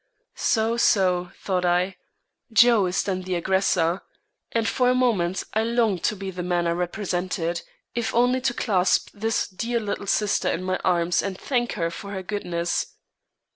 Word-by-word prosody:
"So, 225 +1 +1
so," 180 -5 +3
thought 185 -2 -1
I, 180 +2 +1 0.6
"Joe 225 -3 +5
is 180 - 0
then 185 -2 -2
the 185 0 -3
aggressor!" 180 -1 +1 0.5
And 230 -1 0
for 250 +1 +2
a 250 - +3
moment, 200 -8 +1
I 220 - +2
longed 225 -5 +1
to 215 - +1
be 195 -1 -5
the 180 -1 -5
man 175 -1 0
I 170 - +1
represented, 175 -1 -2 0.3
if 235 -1 -1
only 250 +2 +3
to 250 -1 +1
clasp 185 -5 +2
this 225 +2 -1
dear 230 +5 -2
little 205 -2 -4
sister 205 0 +1
in 175 - -2
my 185 0 0
arms 175 -1 +1
and 195 -2 -4
thank 240 0 -1
her 165 -1 -1
for 200 +3 -7
her 190 -1 -4
goodness. 175 -4 -2
190 Hz, 170 wpm, -24 LUFS, 180-225 Hz, 0.6 s, Joe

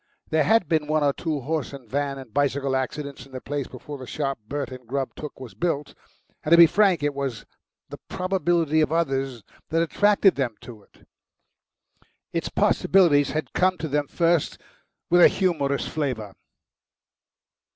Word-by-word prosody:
There 155 -1 +3
had 220 -4 +3
been 155 -2 0
one 155 0 +1
or 140 -1 +3
two 155 -3 -3
horse 150 +1 -3
and 135 -4 -10
van 140 +3 -2
and 130 -5 -11
bicycle 140 -1 0
accidents 135 0 -4
in 135 - -21
the 130 - -5
place 145 0 -4
before 140 +3 -9
the 130 - -9
shop 135 -2 -3
Bert 140 +1 -4
and 125 -2 -10
Grubb 135 +2 -3
took 150 -3 -8
was 130 -4 -9
built, 155 -5 -2 0.5
and, - - -3
to 170 - +8
be 170 - +10
frank, 190 -3 +2
it 145 0 0
was 135 -6 -4 0.4
the - - -9
probability 175 -4 +1
of 155 - +1
others 135 -7 -1 0.3
that 165 +1 +2
attracted 205 +3 +3
them 125 -5 -2
to 115 -4 -11
it. - - -25 1.3
Its - - -2
possibilities 160 -7 +3
had 155 +1 -4
come 185 0 +2
to 160 - -4
them 145 0 -1
first 170 -1 +1 0.5
with 175 0 +6
a - - +10
humorous 155 -7 0
flavour. 125 -10 -3
145 Hz, 170 wpm, -24 LUFS, 135-165 Hz, 1.3 s, be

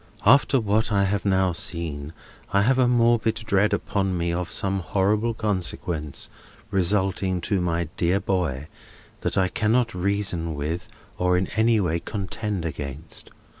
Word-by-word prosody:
—After 135 +3 +5
what 110 0 +1
I 100 -1 +3
have 100 +1 +1
just - - -24
now 95 -1 +3
seen, 80 -4 -3 0.4
I 100 0 +3
have 130 +4 +3
a 125 - +5
morbid 120 -2 +3
dread 105 -1 +1
upon 95 -2 0
me 85 0 -1
of 90 0 -2
some 95 0 0
horrible 105 +5 +1
consequences 90 -8 -3 0.4
resulting 95 -1 +1
to 95 +2 0
my 85 -1 0
dear 90 +3 +2
boy, 85 -8 -1 0.5
that - - -2
I 95 - +4
cannot 115 +4 +1
reason 90 -3 -1
with 75 +4 -3 0.3
or 90 0 +3
in 90 - +1
any 110 0 +4
way 85 -3 0
contend 100 -1 -4
against. 75 0 -5
95 Hz, 150 wpm, -24 LUFS, 85-105 Hz, 0.5 s, After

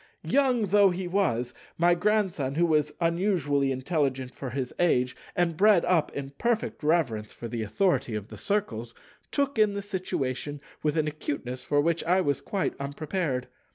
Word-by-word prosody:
Young 255 -5 +2
though 200 0 +6
he 180 0 -3
was, 125 - 0 0.2
my 175 +1 +5
Grandson—who 175 -7 +1
was 150 -2 +2
unusually 165 -6 +1
intelligent 130 -1 -1
for 135 - -6
his 130 0 -3
age, 125 -8 +2 0.2
and 170 -2 +1
bred 200 0 +5
up 170 -4 +2
in 140 -1 -5
perfect 235 -2 0
reverence 140 -10 +1
for 120 - -7
the 115 0 -4
authority 130 - +1
of 105 0 -5
the - - -9
Circles—took 205 - -3
in 210 -2 +4
the 200 - -3
situation 145 -8 -3 0.2
with 150 +1 0
an 155 -1 +2
acuteness 140 -4 -4
for 145 - +1
which 170 +2 +1
I 180 +3 +3
was 145 -6 0
quite 195 -2 -1
unprepared. 145 -1 -2
155 Hz, 155 wpm, -27 LUFS, 130-190 Hz, 0.2 s, though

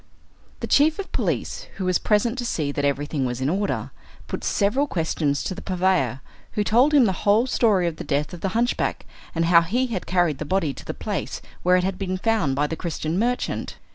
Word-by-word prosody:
The - - -1
chief 305 +2 +4
of 395 - -6
police, - - -2
who 190 - -4
was 185 -1 +2
present 225 +3 +2
to - - -2
see 155 -10 -1
that 145 - -3
everything 145 0 0
was 125 -1 -2
in 130 +2 0
order, 200 +4 -1 0.3
put - - -5
several 235 +8 +1
questions 160 - -1
to - - -3
the 185 - -8
purveyor, 180 - +1 0.3
who 210 - +1
told 245 +8 +4
him 270 -4 +7
the 195 - +2
whole 210 +4 +4
story 215 -8 +2
of 165 -2 -2
the - - -5
death 150 +3 -1
of 175 - -8
the - - 0
hunchback, 240 +2 0 0.3
and 165 0 +1
how 170 0 +6
he 230 +10 0
had 185 - -4
carried 175 -6 +1
the - - -2
body 160 -2 0
to - - -11
the - - -5
place - - -4 0.2
where 180 +1 +4
it 180 - +2
had 185 0 -2
been 185 -1 -2
found 205 -10 +1
by 145 +2 +1
the 160 - -3
Christian 165 0 -3
merchant. 245 +3 -1
185 Hz, 220 wpm, -24 LUFS, 155-215 Hz, 0.3 s, him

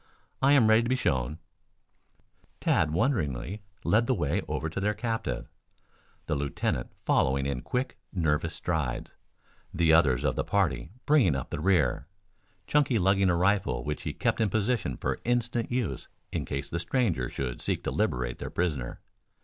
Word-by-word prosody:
I 135 +2 +5
am 135 -6 +6
ready 110 +1 +6
to 115 - -2
be 130 - +3
shown." 70 - 0 1.2
Tad 80 - +2
wonderingly 85 - -1 0.2
led 115 +2 +3
the 130 - +2
way 75 -7 0
over 80 - -2
to 80 - -4
their 105 +2 0
captive, 115 +2 -3 0.8
the - - -1
lieutenant 70 -4 -2
following 65 +1 +2
in 70 -3 -2
quick, 125 - -3
nervous 80 -2 0
strides, 80 -8 -2 0.6
the 80 -1 +3
others 70 -7 +4
of - - +1
the - - 0
party 95 -6 0 0.2
bringing 135 - +4
up 65 - -4
the - - -3
rear, 75 -7 +2 0.6
Chunky 140 -2 +2
lugging 95 0 +3
a 90 - +3
rifle 90 -8 +1
which 75 0 -3
he - - -3
kept - - 0
in 110 - +3
position 110 - 0
for - - -2
instant 120 -1 0
use 110 - -2 0.2
in - - -2
case 70 0 -3
the 85 - -1
stranger 85 - 0
should 65 -2 -4
seek - - -1
to - - -2
liberate 60 -1 -1
their - - -5
prisoner. 75 -9 -2
85 Hz, 165 wpm, -28 LUFS, 70-115 Hz, 1.2 s, am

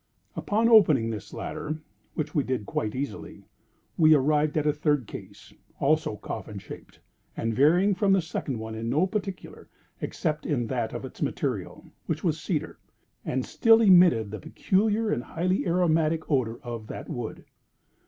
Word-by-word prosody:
Upon 220 +3 +1
opening 155 - +5
this 105 -2 -7
latter 155 0 -5 0.4
(which 155 0 -3
we 150 - +2
did 130 -5 -2
quite 105 +3 -3
easily), 140 +2 -6 0.6
we 155 -1 +7
arrived 150 +2 +2
at 150 - +1
a 150 - +3
third 145 -3 0
case, - - -11 0.3
also - - +1
coffin - - -7
shaped, - - -11 0.4
and 115 0 -1
varying 170 - +4
from 195 +1 +1
the 195 - +3
second 140 -5 -4
one 110 0 -6
in 115 +1 -4
no 150 +9 +3
particular, 195 -1 -5 0.3
except 155 -3 -2
in 130 -7 0
that 120 -2 -2
of - - -5
its - - -11
material, - - -3 0.2
which - - -2
was - - 0
cedar, - - -3 0.4
and 130 - -2
still 225 -1 +5
emitted 175 - +5
the 110 - -5
peculiar 210 +7 0
and - - 0
highly 185 +6 -1
aromatic 165 -2 +1
odor 120 -5 0
of 115 -3 -6
that - - -7
wood. 120 -7 -6
150 Hz, 160 wpm, -27 LUFS, 120-180 Hz, 0.6 s, we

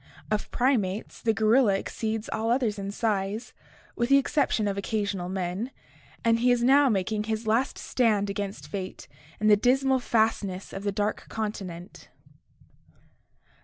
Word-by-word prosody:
Of 210 -1 -1
primates, 225 -6 0
the 225 - +2
gorilla 220 0 +4
exceeds 220 +2 -3
all 225 +1 -1
others 235 -4 +1
in 195 0 -4
size, 205 0 -2 0.4
with 240 +1 0
the 275 - +7
exception 275 -6 +1
of 200 - -1
occasional 200 -3 -2
men, 190 +5 -3 0.6
and 230 0 +4
he 245 +2 +3
is 240 -1 +2
now 275 +2 +5
making 210 0 0
his 220 0 -2
last 230 +5 +1
stand 215 -5 +1
against 200 0 -4
fate 190 -2 -6 0.3
in 215 - -2
the 210 -1 +7
dismal 260 +4 +2
fastness 220 -5 0
of 195 - -6
the 200 - +1
dark 205 +2 -2
continent. 195 -5 -6
215 Hz, 145 wpm, -27 LUFS, 200-235 Hz, 0.6 s, the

